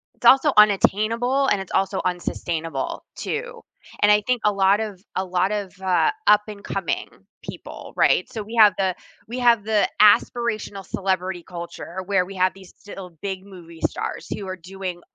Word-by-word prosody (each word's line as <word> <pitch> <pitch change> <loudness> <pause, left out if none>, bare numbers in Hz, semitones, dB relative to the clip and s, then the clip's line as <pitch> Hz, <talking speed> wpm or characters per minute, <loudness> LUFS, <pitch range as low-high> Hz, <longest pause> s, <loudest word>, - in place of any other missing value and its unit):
It's - - -5
also 275 +2 +7
unattainable, 225 +6 +3
and 205 - +2
it's 190 - -8
also 195 0 +1
unsustainable 165 -4 -3
too, 470 +1 -5 0.4
and 205 0 +6
I 210 - +4
think 250 -2 0
a 210 - +4
lot 195 0 +3
of 205 -4 -5
a 190 - 0
lot 185 +1 0
of, 205 -3 -3
uh, 190 - +2 0.2
up 210 0 +6
and 205 -2 -9
coming - - -3 0.3
people, - - -9
right? - - +3
So 220 - -4
we 220 +3 -9
have 210 -2 +7
the 190 -2 +1 0.3
we 245 +3 -5
have 235 -4 +4
the 215 -1 +2
aspirational 215 -1 +2
celebrity 185 -2 -2
culture 170 0 -8
where 190 -3 +2
we 195 +1 -10
have 185 +1 +2
these 190 -2 -15
still 195 -3 -10
big 190 -1 -4
movie 170 -4 -13
stars - - -6
who 200 - -4
are 185 0 -5
doing 185 0 -7
195 Hz, 175 wpm, -23 LUFS, 185-215 Hz, 0.4 s, also